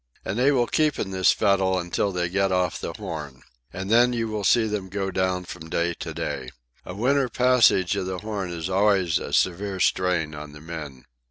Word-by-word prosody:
And 105 - -2
they 135 +3 +4
will 125 -4 +2
keep 155 +3 +1
in 95 - -3
this 95 -1 +4
fettle 95 -2 +2
until 90 +3 -1
they 90 -2 -1
get 95 +2 0
off 90 -1 0
the - - -4
Horn. 70 -5 -7 0.3
And 95 +1 -5
then 120 +2 +5
you 115 -2 -2
will 105 -1 -3
see 115 +3 +4
them 105 -3 -3
go 95 0 -3
down 95 -1 -1
from 80 -2 -9
day 85 +1 0
to - - -5
day. 65 -2 -4 0.3
A 90 - -8
winter 130 +4 +1
passage 125 -8 +3
of 95 - -2
the 95 -1 -3
Horn 105 -2 -4
is 85 0 -4
always 95 -3 +2
a - - -7
severe 95 +2 0
strain 90 -5 +1
on 75 0 -8
the 75 - -11
men. 75 -5 -8
95 Hz, 205 wpm, -24 LUFS, 85-105 Hz, 0.3 s, then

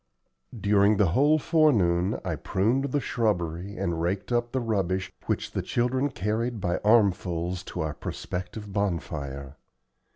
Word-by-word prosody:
During 100 0 +4
the 95 -4 +3
whole 145 - +4
forenoon 105 - +2
I - - -1
pruned 115 +8 0
the 140 +1 0
shrubbery, 100 - -1
and 85 -1 -1
raked 95 +7 -2
up 120 0 0
the 130 - 0
rubbish 95 -6 -1 0.2
which - - -1
the - - -2
children 130 +3 0
carried 115 +1 -2
by 90 -2 -1
armfuls 95 -5 +2
to - - -5
our 80 -1 -2
prospective 95 +6 -6
bonfire. 75 -8 -3
100 Hz, 135 wpm, -27 LUFS, 85-120 Hz, 0.2 s, During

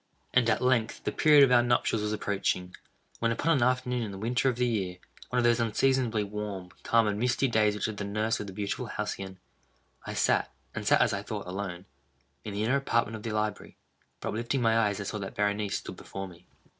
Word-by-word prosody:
And 125 -2 +4
at 110 - +1
length 120 -3 +1
the - - -1
period 150 -2 +6
of 135 - +5
our 120 -1 +7
nuptials 120 -2 +1
was 105 0 -1
approaching, 95 -3 -1 0.4
when, 115 0 +1
upon 160 +8 +2
an - - 0
afternoon 125 0 +1
in 110 -3 -3
the 95 - -7
winter 120 +6 +1
of 125 - -1
the 125 +1 +1
year—one 100 +1 -4
of 120 - +3
those 120 0 +4
unseasonably 115 -1 +2
warm, 100 -3 -5
calm, 115 -1 +3
and 105 0 -1
misty 125 +3 +2
days 110 -3 +2
which 105 - -1
are - - -2
the 105 -1 -5
nurse 105 +2 -1
of 105 - -5
the - - -6
beautiful 100 0 -3
Halcyon 95 -1 -4 0.7
(*1),—I - - -4
sat, - - +2 0.2
(and - - -5
sat, - - +5
as - - +3
I - - -2
thought, - - -5
alone,) 90 -1 -5 0.6
in 100 - -6
the 105 - -1
inner 130 +5 +2
apartment 115 -5 0
of 110 - -7
the 115 - -4
library. 105 -1 -3 0.4
But, - - -3
uplifting 120 +4 -1
my 115 0 +4
eyes, 105 -3 +2
I - - -3
saw 105 +2 -4
that 95 -1 -6
Berenice 105 0 0
stood - - -8
before 95 0 -6
me. 90 -1 -16
110 Hz, 220 wpm, -29 LUFS, 100-120 Hz, 0.7 s, our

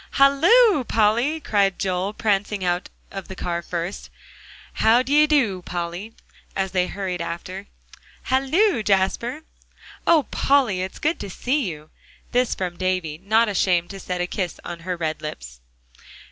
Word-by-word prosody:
"Halloo, 320 - +5
Polly!" 235 +8 +2
cried 200 -8 +1
Joel, 190 +1 -1
prancing 205 -2 0
out 175 0 -1 0.2
of 195 -2 -7
the 190 - -8
car 170 -1 -3
first, 175 +2 -5 0.6
and - - -21
"How 230 +3 +5
d'ye 295 +3 +4
do, 235 -12 +2
Polly?" 175 +5 -5 0.4
as 190 -1 -1
they 180 -1 +2
all - - -8
hurried 185 -3 -3
after. 185 +4 -6 0.6
"Halloo, 275 - +2
Jasper!" 210 +8 0 0.6
"Oh, 330 -3 +5
Polly! 255 -10 +2
it's 190 +1 -5
good 310 +3 0
to 200 - -6
see 250 +4 -1
you!" 155 -1 -10 0.4
This 250 0 +1
from 180 -2 -4
Davie, 185 -4 -1
not 220 +3 +3
ashamed 180 -3 +1
to 195 - -8
set 180 -1 -3
a - - +1
kiss 180 -1 -4
on 175 -1 -6
her 180 +1 -4
red 160 -2 -3
lips. - - -7
195 Hz, 155 wpm, -23 LUFS, 180-250 Hz, 0.6 s, Halloo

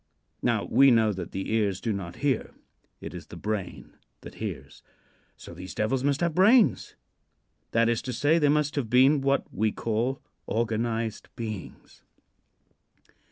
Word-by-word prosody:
Now, - - +1
we 135 0 +5
know 110 -3 +4
that 90 -3 -6
the 95 +3 -4
ears 100 -4 +1
do 115 - -2
not 90 -3 -6
hear. 135 -5 0 0.5
It - - -7
is - - -9
the - - -11
brain 105 -3 -5 0.3
that - - -10
hears. - - -6 0.6
So - - -11
these 90 +2 -9
devils 125 +5 0
must 140 +1 +1
have 170 -2 +1
brains; 210 +7 +4 0.7
that 115 0 +2
is 115 -1 +1
to 130 - -5
say, 145 +8 +2
they 150 -2 +3
must 150 0 +1
have 125 -6 -1
been 135 +4 +5
what 135 +1 +1
we 110 +2 +1
call 115 +6 -2 0.3
"organized 115 0 -2
beings." 110 -6 -8
115 Hz, 155 wpm, -27 LUFS, 110-140 Hz, 0.7 s, we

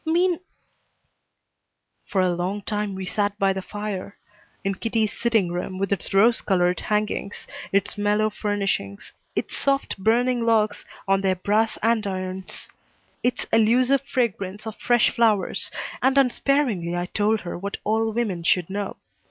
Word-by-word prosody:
Mean 345 +1 +2 0.8
" - - -53
For 195 - +1
a 180 -1 +2
long 185 +4 -2
time 210 -2 -2
we 190 0 -5
sat 205 +2 -1
by 195 -1 +2
the 190 - -4
fire 205 -1 -5 0.5
in 195 0 0
Kitty's 220 +1 -1
sitting 220 -7 +1
room 180 +1 -4
with 195 +1 0
its 195 - -3
rose 220 +4 +5
colored 180 -2 +2
hangings, 210 -1 -2 0.3
its 200 +1 0
mellow 210 +1 +2
furnishings, 195 - -2 0.2
its - - -2
soft 275 -6 0
burning 240 +4 +2
logs 215 -2 +2 0.2
on 195 0 +3
their 190 -1 +2
brass 210 +4 +1
andirons, 190 -4 -1 0.5
its 245 - 0
elusive 245 +5 +4
fragrance 210 -7 -2
of 220 -1 -5
fresh 240 -2 +3
flowers, 220 -5 +2 0.3
and 265 +1 +3
unsparingly 250 -9 +2
I 175 0 -1
told 210 +3 +1
her 175 - -5
what 200 +3 -4
all 220 +1 +1
women 215 -6 -1
should 180 +1 +1
know. 200 0 -3
205 Hz, 145 wpm, -24 LUFS, 190-230 Hz, 0.8 s, rose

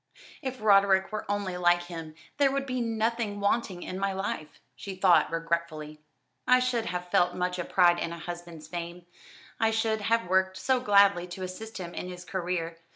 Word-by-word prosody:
"If 260 -2 -5
Roderick 195 -2 +4
were 215 -1 -5
only 200 -3 -2
like 175 0 +3
him 165 -3 -8 0.2
there 280 -2 +4
would 275 0 -1
be 255 -2 -2
nothing 225 -2 -1
wanting 200 -3 0
in 185 - -5
my 195 0 0
life," 190 -6 -4 0.2
she 195 -2 -7
thought 180 -5 +4
regretfully. 165 -2 -3 0.5
"I 250 - +7
should 250 -3 0
have 180 0 -4
felt 175 - +3
much 180 0 -2
a - - -1
pride 175 -2 +4
in 170 - -2
a 170 - -6
husband's 170 -1 -8
fame, 170 +1 -6 0.5
I 225 - +3
should 220 -1 0
have 230 -1 +1
worked 190 +1 +2
so 260 -1 +1
gladly 200 -5 +4
to 180 +1 -7
assist 220 +5 -7
him 175 -2 -6
in 180 - -5
his 180 0 -9
career. 170 -3 -3
185 Hz, 185 wpm, -28 LUFS, 175-220 Hz, 0.5 s, I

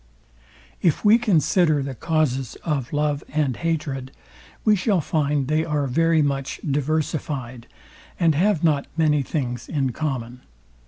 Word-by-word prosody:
If 170 +4 +1
we 220 +3 +7
consider 170 - +2
the 135 0 -4
causes 135 -3 -1
of 140 -6 -2
love 150 -1 0
and 145 -5 0
hatred, 145 -6 -2 0.5
we 215 -1 +5
shall 195 0 +1
find 145 -3 0
they 155 +2 +1
are 150 -3 -1
very 165 +4 +2
much 135 -1 -2
diversifyed, 145 -4 -2 0.5
and 165 -2 +4
have 175 +2 +1
not 150 -4 +2
many 150 -3 +3
things 125 -5 -3
in 135 -4 0
common. 125 -4 -4
150 Hz, 130 wpm, -23 LUFS, 135-160 Hz, 0.5 s, we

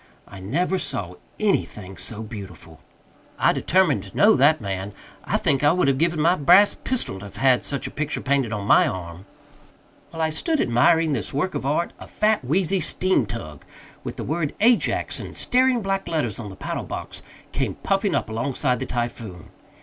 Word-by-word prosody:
I 100 - -11
never 175 - -1
saw 90 - -3 0.3
anything 105 - -1
so 110 +5 -3
beautiful. 95 -7 -10 0.6
I - - +3
determined 170 - +2
to 95 - -11
know 215 +2 +6
that 145 +4 +4
man. 100 -1 -4 0.3
I - - +1
think 135 0 0
I 145 - +5
would 180 -5 +1
have 135 -1 +2
given 165 0 +1
my 165 +3 +4
brass 185 +5 +5
pistol 240 - -2
to 100 - -9
have 100 - -11
had 130 -2 +3
such 140 - -3
a - - -5
picture 150 +1 -3
painted 135 -4 0
on 105 -2 -3
my - - +5
arm. 90 0 -7 0.8
While 165 -1 -4
I 160 - +1
stood 310 - -1
admiring 160 - +3
this 110 -8 -3
work 185 +6 -1
of 135 - -3
art, 155 +4 0
a - - -10
fat 215 -6 +1
wheezy 185 +7 +1
steamtug, 115 - -1 0.4
with - - -6
the - - -5
word 155 0 -2
AJAX 235 +2 +2
in - - -8
staring 255 -2 +2
black 195 0 -2
letters 145 - -2
on 105 -3 -6
the 95 - -10
paddlebox, - - -6 0.3
came - - -2
puffing - - 0
up - - -1
alongside 125 +3 -1
the 130 - -4
Typhoon. 115 -7 -5
140 Hz, 180 wpm, -23 LUFS, 105-175 Hz, 0.8 s, know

